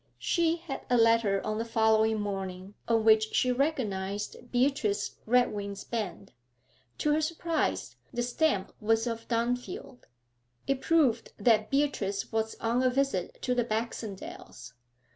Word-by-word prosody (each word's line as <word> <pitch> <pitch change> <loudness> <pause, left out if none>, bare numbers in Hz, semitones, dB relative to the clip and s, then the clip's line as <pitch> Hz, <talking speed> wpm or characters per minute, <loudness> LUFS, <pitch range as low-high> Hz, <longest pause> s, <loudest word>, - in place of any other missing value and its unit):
She 335 -2 +1
had 330 -5 -6
a 245 - +4
letter 230 -4 +3
on 215 0 -1
the - - 0
following 220 -1 +3
morning 195 -1 -4
on 225 -1 +2
which 220 0 +4
she 250 - +3
recognised 220 -6 -2
Beatrice 245 -6 0
Redwing's 205 -5 +1
bend. 215 -6 -4 0.7
To 300 - +1
her 310 - +2
surprise, 330 0 -1
the 240 - -1
stamp 245 -5 0
was 225 +1 +2
of 230 -1 -4
Dunfield. 245 +1 -3 0.6
It 275 -1 0
proved 280 -9 +2
that 220 -3 +3
Beatrice 265 -9 0
was 220 0 -1
on 235 +2 0
a 255 - +4
visit 265 -8 -1
to 250 - +1
the 245 -1 +2
Baxendales. 215 - -5
230 Hz, 135 wpm, -29 LUFS, 210-255 Hz, 0.7 s, a